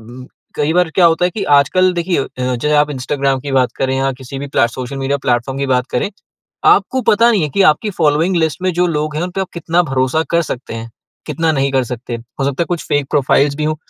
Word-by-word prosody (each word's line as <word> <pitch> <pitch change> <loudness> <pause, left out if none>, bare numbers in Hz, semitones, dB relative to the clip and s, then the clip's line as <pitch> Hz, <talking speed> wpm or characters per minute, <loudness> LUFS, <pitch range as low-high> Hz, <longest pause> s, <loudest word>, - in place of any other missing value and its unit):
ब 120 +3 -12 0.3
कई 150 +2 0
बार 180 0 +2
क्या 185 - +4
होता 165 +2 +2
है 180 - +2
कि, 200 +2 -5
आजकल 180 +5 +3
देखिए, 170 -4 -1 0.2
जैसे 125 +4 -1
आप 150 0 +3
इंस्टाग्राम 135 0 -1
की 140 0 -6
बात 130 -2 +2
करें 130 0 -1
या 135 0 +1
किसी 135 +1 -8
भी 140 - -5
प्ले 125 - +2
सोशल 130 +3 -6
मीडिया 135 +1 -1
प्लेटफ़ॉर्म 125 +1 -1
की 140 - -1
बात 125 -1 +1
करें, 125 +10 -1 0.6
आपको 260 - +3
पता 230 +3 +4
नहीं 205 - +2
है 150 - -1
कि 200 - +1
आपकी 210 +8 -4
फ़ॉलोइंग 160 +3 +2
लिस्ट 160 +1 0
में 185 0 +1
जो 175 +2 +2
लोग 150 -1 -2
हैं, 155 - -1
उन 180 - -4
पे 195 - -2
आप 190 - -4
कितना 170 +1 +1
भरोसा 135 +2 0
कर 170 - +3
सकते 130 -7 -6
हैं, 115 0 -6 0.4
कितना 165 -1 0
नहीं 140 -2 0
कर 130 -1 +2
सकते। 120 0 -6 0.2
हो - - 0
सकता 140 +4 0
है - - -9
कुछ 175 -2 -3
फ़ेक 145 -1 0
प्रोफ़ाइल्स 140 0 +2
भी 155 - -3
हों। 155 +1 0
145 Hz, 245 wpm, -16 LUFS, 130-170 Hz, 0.6 s, क्या